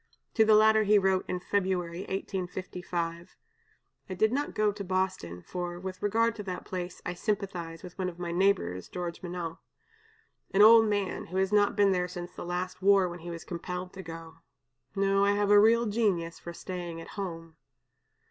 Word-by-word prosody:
To 220 - +5
the 215 0 +6
latter 220 0 +6
he 210 0 +5
wrote 190 -1 +2
in 180 - -2
February, 180 -3 -1
1855: 180 -3 -4 0.7
"I - - -3
did 220 +4 +3
not 285 +3 -2
go 215 -1 +2
to 205 0 -7
Boston, 185 - -2
for, 175 -1 -5
with 185 0 -7
regard 230 +3 +2
to 210 - -5
that 185 -2 -5
place 180 -1 -6
I 180 - -2
sympathize 180 -4 -3
with 180 -1 -10
one 185 -1 0
of 170 - -11
my 175 -1 -4
neighbors 170 - +1
(George 175 -1 -5
Minott), 175 -2 -5 1.0
an 205 - +7
old 225 0 +8
man, 205 -2 -1
who 185 - -4
has 190 +1 +1
not 205 -1 +4
been 200 -1 +4
there 180 -1 +1
since 175 0 -7
the - - -8
last 180 +1 -4
war, 195 -1 +5
when 175 0 -7
he 170 +1 -8
was 170 -1 -6
compelled 180 +1 -5
to 190 - -7
go. 165 -2 -9 0.6
No, 195 0 +2
I 200 0 +4
have 205 0 +1
a 205 - +8
real 230 +3 +5
genius 200 -7 0
for 170 - -7
staying 175 -1 -6
at 165 - -10
home." 165 -5 -6
185 Hz, 185 wpm, -29 LUFS, 175-205 Hz, 1.0 s, old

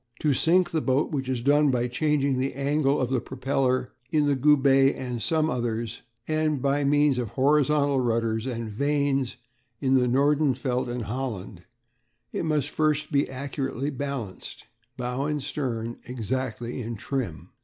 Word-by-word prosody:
To 150 -2 +3
sink 175 +7 +3
the 160 - 0
boat, 135 +2 +1
which 135 -4 -2
is 125 -3 -2
done 145 +2 +4
by 125 -2 +1
changing 140 0 +1
the 135 +1 -1
angle 140 +1 +1
of 130 -1 -1
the 130 -3 +1
propeller 130 -1 -1 0.2
in 150 0 +2
the 145 -1 +2
Goubet 135 -1 +4
and 125 -3 -4
some 155 +6 +1
others, 115 -4 -2 0.3
and 155 -2 +1
by 140 +2 +1
means 145 -1 +3
of 120 -4 -2
horizontal 145 +1 +2
rudders 115 -1 0
and 115 -3 -3
vanes 140 +2 0 0.4
in 135 -1 +1
the 125 -2 +4
Nordenfelt 130 -2 +1
and 120 -1 -3
Holland, 105 -6 -5 0.7
it - - -2
must 150 -3 0
first 155 0 0
be 140 -1 +3
most - - -12
accurately 135 0 -3
balanced, 135 -8 -6 0.3
bow 125 +2 -2
and 150 -2 -2
stern 120 -6 -3
exactly 125 0 -3
in 115 0 -4
trim. 110 - -4
135 Hz, 155 wpm, -26 LUFS, 125-145 Hz, 0.7 s, done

